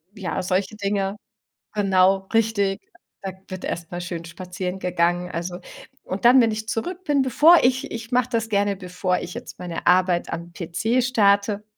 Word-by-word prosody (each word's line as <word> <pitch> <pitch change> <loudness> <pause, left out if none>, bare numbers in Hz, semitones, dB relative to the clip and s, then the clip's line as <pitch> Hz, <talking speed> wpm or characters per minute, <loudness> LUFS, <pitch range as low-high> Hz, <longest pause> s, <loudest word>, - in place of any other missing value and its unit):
Ja, 190 -2 -3
solche 190 +4 -1
Dinge 200 -1 -1 0.6
genau, 195 -1 +3
richtig. 210 -3 +1 0.4
Da 195 -1 -4 0.2
wird 185 -1 -7
erst 170 -1 -5
mal 175 0 -4
schön 170 -1 -5
spazieren 180 +2 -6
gegangen, 175 0 0
also 175 +2 -4 0.4
und 190 +4 -5
dann, 250 +2 +7
wenn 230 -3 +4
ich 220 +1 -5
zurück 355 +12 -3
bin, 290 -4 +2
bevor 300 +7 +6
ich 255 +1 +1
ich 230 +1 -7
mach 250 -1 +2
das 230 -3 -1
gerne, 200 -1 +1
bevor 180 0 -2
ich 175 - -7
jetzt - - -9
meine 175 -2 -6
Arbeit 180 -1 +3
am 170 +1 -6
PC 215 +9 0
starte, 205 -4 +2
195 Hz, 170 wpm, -23 LUFS, 180-225 Hz, 0.6 s, dann